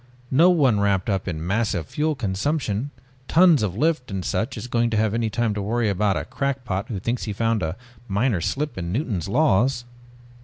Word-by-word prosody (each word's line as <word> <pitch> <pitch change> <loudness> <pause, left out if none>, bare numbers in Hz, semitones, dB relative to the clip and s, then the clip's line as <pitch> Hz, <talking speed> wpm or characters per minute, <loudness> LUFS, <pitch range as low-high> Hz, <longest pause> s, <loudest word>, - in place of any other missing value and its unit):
No 160 +7 +6
one 135 - +3
wrapped 100 -1 +1
up 95 -1 -2
in 80 -2 -3
massive 95 -4 0
fuel 155 - -1
consumption, 115 +2 -1 0.4
tons 170 -4 +5
of 100 -3 -2
lift 155 -1 0
and 95 -3 -4
such 115 +7 -2
is - - -5
going 120 -1 +1
to 110 - 0
have 110 -1 +2 0.2
time 115 0 0
to 105 - -3
worry 115 +2 0
about 100 0 +1
a - - -3
crackpot 125 -9 -3
who 105 -5 -4
thinks 115 +6 -2
he 105 - -3
has - - -15
found 115 -2 +1
a 80 +3 -3 0.3
minor 105 -1 +1
slip 140 - -2
in 85 -1 -4
Newton's 105 - -2
laws." 125 -1 +2
110 Hz, 195 wpm, -23 LUFS, 95-135 Hz, 0.4 s, No